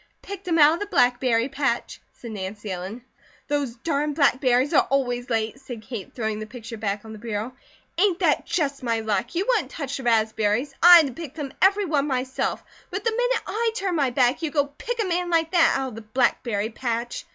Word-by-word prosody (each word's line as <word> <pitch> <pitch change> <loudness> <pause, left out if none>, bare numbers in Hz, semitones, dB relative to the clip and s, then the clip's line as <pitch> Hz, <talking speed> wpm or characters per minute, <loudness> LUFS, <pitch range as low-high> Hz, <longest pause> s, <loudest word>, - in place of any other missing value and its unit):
"Picked 395 -1 -8
him 335 -2 +2
out 300 0 +7
of 335 - -3
the 410 - -4
blackberry 245 - +2
patch," 275 -3 -2
said 235 - -10
Nancy 205 0 -6
Ellen. 190 +7 -6 0.4
"Those 285 -5 -1
darn 295 +2 -1
blackberries 260 -1 +3
are - - +4
always 245 -3 0
late," 225 +1 -1
said 245 -5 -8
Kate, 220 -3 -7
throwing 220 -3 -2
the 215 - -6
picture 230 0 -8
back 205 0 -3
on 220 - -9
the 215 - -10
bureau. 225 +2 -4 0.5
"Ain't 380 -2 +3
that 335 -6 +1
just 295 -5 -1
my 230 -3 -1
luck! 215 - -2
You 370 +3 0
wouldn't - - +1
touch 280 -3 -5
the 265 - -7
raspberries. 220 +2 +1
I 350 +1 +10
had 325 - +5
to 270 - -5
pick 315 -3 -8
them 290 -4 -5
every 400 +1 +4
one 295 -4 0
myself. 260 -1 -2 0.3
But 385 +1 -4
the 460 - +1
minute - - 0
I 455 +1 -1
turn 385 -5 -1
my 280 -5 +2
back, 250 +3 +2
you 325 - -1
go 285 -1 +1
pick 485 0 -4
a 440 - +1
man 355 -1 -1
like 330 -1 +1
that, 335 -3 +4
out 265 -1 -2
of - - -12
the 225 - -8
blackberry 220 -1 0
patch. 235 0 -3
265 Hz, 215 wpm, -24 LUFS, 230-330 Hz, 0.5 s, I